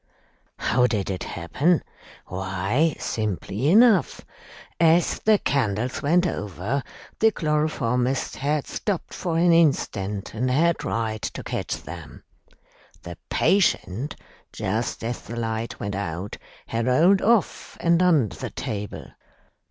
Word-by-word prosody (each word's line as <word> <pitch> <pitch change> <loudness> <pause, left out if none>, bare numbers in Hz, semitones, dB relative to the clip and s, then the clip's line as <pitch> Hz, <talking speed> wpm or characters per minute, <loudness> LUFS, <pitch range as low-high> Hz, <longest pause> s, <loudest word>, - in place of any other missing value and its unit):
"How 125 +3 +2
did 100 -5 -1
it 95 - -4
happen? 145 - 0 0.4
Why, 95 - 0
simply 110 +2 -2
enough. 210 - +4 0.5
As 165 +1 +4
the 215 -1 +4
candles 125 - -1
went 170 +5 +3
over, 105 - -2 0.4
the 225 - +6
chloroformist 140 - 0
had 145 +1 0
stopped 200 -5 -3
for 170 -3 -2
an 170 0 +5
instant 105 - +1
and 125 +4 -1
had 165 +6 +2
tried 110 -1 -2
to - - -5
catch - - -4
them. - - -10 0.8
The - - -7
patient, 145 - +1 0.4
just 110 +5 -2
as 120 +1 -3
the 120 - -8
light 115 0 -3
went 100 0 -3
out, 95 0 -4 0.3
had 115 +1 -2
rolled 170 +10 +4
off 230 -2 +1
and 170 0 +3
under 155 - +3
the - - -5
table. 105 -1 -6
125 Hz, 120 wpm, -24 LUFS, 105-165 Hz, 0.8 s, the